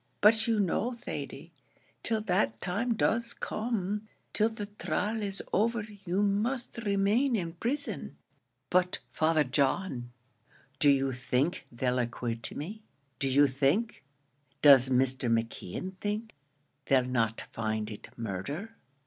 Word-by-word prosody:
But 220 +2 +5
you 225 -2 +2
know, 205 +5 +1
Thady, 235 - -6 0.5
till 225 -2 0
that 115 - +1
time 215 - -1
does 230 +2 +1
come 215 -2 -2 0.3
till 220 +1 +3
the 220 -2 -5
trial 210 +1 -2
is 195 -1 -2
over, 230 +1 +2 0.2
you 185 +3 +1
must 235 +5 0
remain 215 +5 +2
in 170 -5 -2
prison." 260 - -3 0.6
"But, 180 0 +3
Father 155 -1 +3
John, 135 -1 0 0.7
do 145 - +6
you 135 -1 +3
think 130 +6 -1
they'll 125 +1 0
acquit 120 -1 -2
me? 200 +9 -6 0.4
do 135 - +2
you 140 +2 +6
think 140 - +1 0.6
does 135 -3 +8
Mr. 130 -1 +2
McKeon 115 - -2
think, 210 +3 -3 0.6
they'll 130 -2 +4
not 115 -3 0
find 110 -1 -2
it 105 - -9
murder?" 140 - -4
180 Hz, 125 wpm, -30 LUFS, 130-215 Hz, 0.7 s, does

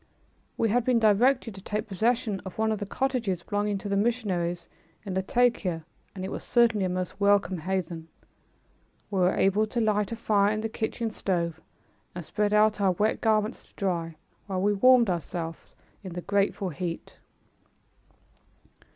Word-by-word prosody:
We 225 - +2
had 240 +3 +2
been 250 0 +3
directed 230 +2 +3
to 195 - -11
take 210 +2 -3
possession 220 +1 0
of 190 - -9
one 220 0 +1
of 215 - -1
the 205 - -4
cottages 230 -8 -1
belonging 205 0 -1
to 200 - -6
the 200 - 0
missionaries 190 -6 -1 0.4
in 195 - -4
Latakia, 190 -4 +1 0.3
and 185 -1 -5
it 195 - -5
was - - -5
certainly 230 -5 +3
a - - -1
most 185 +2 -4
welcome 200 -3 +3
haven. 175 -2 -3 1.0
We 195 - 0
were 180 +1 +3
able 205 +3 +2
to 235 - -2
light 210 -2 +1
a - - -2
fire 205 -3 +2
in 215 0 -2
the 225 - -2
kitchen 225 0 -3
stove 170 -5 -2 0.5
and 175 -3 -6
spread 210 +4 0
out 210 0 +3
our 190 -2 +3
wet 210 +5 0
garments 215 -1 +1
to - - -27
dry, 170 -4 -2 0.3
while 190 -2 -2
we 205 +1 +3
warmed 245 +3 +5
ourselves 165 -1 -5 0.3
in 185 -3 -7
the 175 - -4
grateful 200 0 0
heat. 170 +1 -6
200 Hz, 170 wpm, -27 LUFS, 185-220 Hz, 1.0 s, warmed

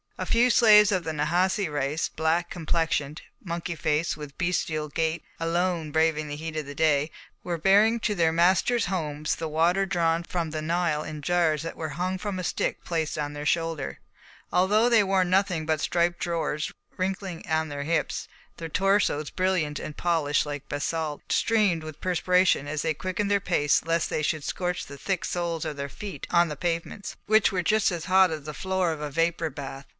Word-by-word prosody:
A - - -3
few 245 +2 +3
slaves 210 -3 +7
of 185 -3 +1
the 160 0 -3
Nahasi 175 +6 +1
race, 145 +2 -1
black 165 +2 0
complexioned, 160 -3 -1 0.2
monkey 170 -1 -4
faced, 155 +1 0
with 145 -2 -9
bestial 165 -4 -1
gait, 160 +2 -1 0.2
alone 165 -1 0
braving 160 -1 +1
the 145 - -5
heat 160 +1 -6
of 150 -2 -3
the 145 - -7
day, 150 -1 +2 0.3
were 175 -1 -2
bearing 205 +7 +4
to 215 - 0
their 165 -4 +2
masters' 185 +8 +3
homes 155 -5 -2
the 165 - -4
water 170 +5 +2
drawn 170 -3 +1
from 170 -2 -3
the 155 0 -3
Nile 165 -1 0
in 155 -1 -7
jars 165 -2 +2
that 165 - -5
were 160 -1 -4
hung 185 +1 -1
from 200 0 -3
a 185 - -3
stick - - -2
placed 160 -3 -2
on 145 -1 -3
their 145 0 -4
shoulder. 165 - -1 0.5
Although 210 +6 +4
they 230 -3 +5
wore 190 -1 +2
nothing 185 -3 +1
but 155 -2 0
striped 175 0 +1
drawers 165 -3 -2 0.3
wrinkling 185 -2 -3
on 160 0 +1
their 145 -1 -4
hips, 165 +3 -1 0.3
their 165 -1 -6
torsos, 190 -5 +1
brilliant 180 -6 0
and 150 - -7
polished 160 -5 +1
like 145 -1 -6
basalt, 155 0 -3
streamed 205 -8 +2
with 155 -1 -9
perspiration 180 -4 +2
as 150 0 -2
they 160 - +1
quickened 185 +5 -2
their 200 0 +3
pace 160 -7 +2
lest 165 0 0
they - - 0
should 155 0 -1
scorch 180 +2 -2
the 140 - -10
thick 190 +2 -2
soles 170 -2 -2
of 155 -2 -4
their 140 0 -4
feet 200 +6 -7
on 170 0 +4
the 150 - -5
pavements, 170 +5 -3
which 215 0 +4
were 180 -2 -1
as 180 -6 +1
hot 190 0 +5
as 155 -2 -5
the 150 - -5
floor 190 0 0
of 155 -2 -5
a 150 - -3
vapour 165 +2 0
bath. 140 -1 -8
165 Hz, 190 wpm, -26 LUFS, 155-185 Hz, 0.5 s, slaves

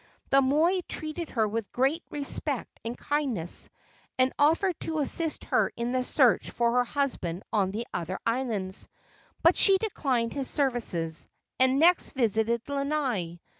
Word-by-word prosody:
The 275 0 +6
moi 310 +8 +3
treated 310 +1 -4
her 220 -3 +1
with 220 0 -4
great 270 +7 +1
respect 285 -1 -3
and 230 +2 -5
kindness, 260 - -2 0.5
and 255 0 +2
offered 330 +5 +3
to 320 -1 -3
assist 310 +2 0 0.3
in 235 +1 -2
the 255 0 0
search 250 -2 +3
for 235 -1 +1
her 245 +1 +3
husband 235 - -2
on 200 -3 +2
the 220 +5 -4
other 180 +2 -3
islands; 230 -6 -2 0.6
but - - +6
she 390 -1 +6
declined 265 - -1
his 275 -2 -2
services, 220 - -1 0.3
and 260 +1 +4
next 350 +3 +4
visited 230 -1 0
Lanai. 275 - -2
255 Hz, 140 wpm, -28 LUFS, 225-290 Hz, 0.6 s, The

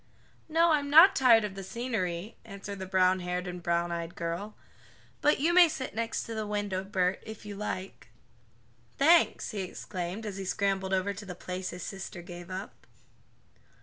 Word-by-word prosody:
"No, 330 +1 +4
I'm 290 -2 +1
not 335 +7 +8
tired 235 -4 +6
of 205 -2 -3
the 195 - -7
scenery," 200 -3 -3
answered 200 -2 -8
the 190 - -5
brownhaired 185 -1 +1
and 180 0 -6
browneyed 170 0 -1
girl, 170 +5 -4 0.7
"but 295 - +3
you 325 +5 +2
may 350 -2 +8
sit 275 -4 -5
next 230 +1 -2
the 220 -2 -4
window, 205 -2 -2
Bert, 190 -1 0
if 220 -1 -10
you 205 -1 -6
like." 195 -5 -5 0.9
"Thanks!" 330 +4 +4
he 205 -3 -3
exclaimed 185 +2 -5
as 200 -2 -5
he 195 - -5
scrambled 195 0 0
over 190 +1 +1
to 200 +1 -9
the 180 - -6
place 185 +1 -5
his 180 -1 -7
sister 190 -2 -7
gave 175 0 -10
up. 190 +2 -8
195 Hz, 165 wpm, -29 LUFS, 180-225 Hz, 0.9 s, not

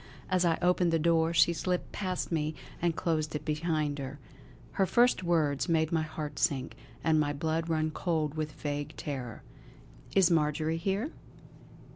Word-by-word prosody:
As 185 -1 +3
I 165 -1 +3
opened 180 -1 +3
the 165 - +3
door, 165 0 +3
she 170 0 +4
slipped 180 +1 -2
past 185 -3 -3
me 155 -1 -1 0.3
and 170 -1 +1
closed 155 -3 -1
it 150 - -4
behind 150 -2 -1
her. 135 +1 -5 0.5
Her 195 - +1
first 240 -1 +4
words 160 -4 +1
made 160 -1 +2
my 165 -1 +2
heart 155 -2 -5
sink, 130 -2 0 0.3
and 160 -1 +3
my 145 -1 +1
blood 160 +3 -1
run 155 -1 +1
cold 155 -3 -1
with 155 -1 -3
vague 145 0 -4
terror: 130 -6 -5 0.7
"Is 190 -2 +5
Marjory 155 0 +1
here?" 195 - -1
160 Hz, 160 wpm, -30 LUFS, 150-170 Hz, 0.7 s, Is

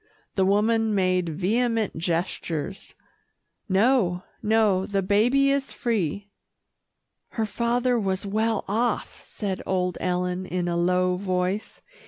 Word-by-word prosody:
The 190 -1 +2
woman 220 +2 +2
made 185 -2 +1
vehement 220 +6 0
gestures, 170 +1 -3 0.7
"No, 195 -3 +2 0.2
no, 210 -3 +2
the 195 -1 0
baby 245 +8 +3
is 275 0 -1
free." 205 - -2 1.1
"Her 220 - +1
father 240 +3 +1
was 195 -2 -1
well 215 +2 0
off," 225 +3 -1
said 195 -3 -4
old 180 -2 -1
Ellen 180 0 -1
in 180 -1 -2
a 170 - -1
low 180 +1 +2
voice. 185 +1 -2
195 Hz, 115 wpm, -25 LUFS, 180-225 Hz, 1.1 s, baby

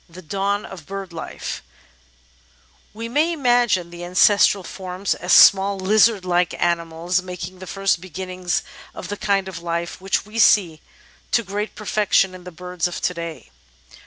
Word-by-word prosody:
The 180 +2 -12
Dawn 200 +5 -1
of 175 -5 -11
Bird 195 -2 -6
Life 165 - -6 1.3
We 225 +2 -6
may 300 +8 +1
imagine 240 - +2
the 175 0 -8
ancestral 195 +2 +4
forms 185 +2 -3
as 180 - -4
small 195 0 +7
lizard 205 +1 +3
like 175 0 0
animals, 170 +1 0
making 185 0 -8
the 185 - -9
first 195 -3 0
beginnings 185 0 -3 0.3
of - - -8
the 205 - -3
kind 200 -2 0
of 175 -3 -7
life 170 +1 -4
which 195 +1 -1
we 215 +2 -6
see 180 -8 +4 0.5
to 235 - +2
great 205 +2 -4
perfection 205 -2 +1
in 180 -1 -12
the 180 - -8
birds 180 0 -3
of 175 - -6
to 180 - -1
day. 170 - -7
185 Hz, 160 wpm, -21 LUFS, 175-200 Hz, 1.3 s, small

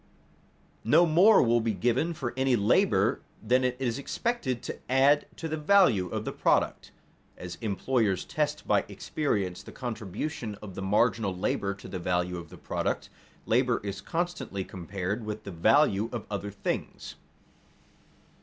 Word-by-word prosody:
No 170 +10 +5
more 180 +7 +6
will 120 -1 +3
be 110 -2 -1
given 125 - 0
for 120 -5 -4
any 130 -1 +2
labor 105 -2 +2 0.2
than 125 +4 +3
it 125 -1 +1
is 125 -1 -2
expected 170 - -2
to - - -6
add 135 +3 +4
to 165 - -5
the 155 0 -3
value 150 - +4
of - - -4
the - - -2
product. - - +1 0.5
As 90 -1 -8
employers 110 -1 0
test 150 -2 -2
by - - +3
experience 100 - -2
the - - -11
contribution 115 - -5
of 100 -1 -10
the 95 - -6
marginal 105 0 +1
labor 100 +1 -1
to 100 - -11
the 95 - -5
value 90 0 -1
of 85 -2 -9
the - - -12
product, - - -3 0.3
labor 125 +1 +2
is 100 -1 -5
constantly 175 - -3
compared 95 +4 -4
with 105 0 -5
the 100 - -7
value 105 - +3
of 120 -3 -5
other 100 0 -3
things. 100 - -4
115 Hz, 155 wpm, -28 LUFS, 100-140 Hz, 0.5 s, more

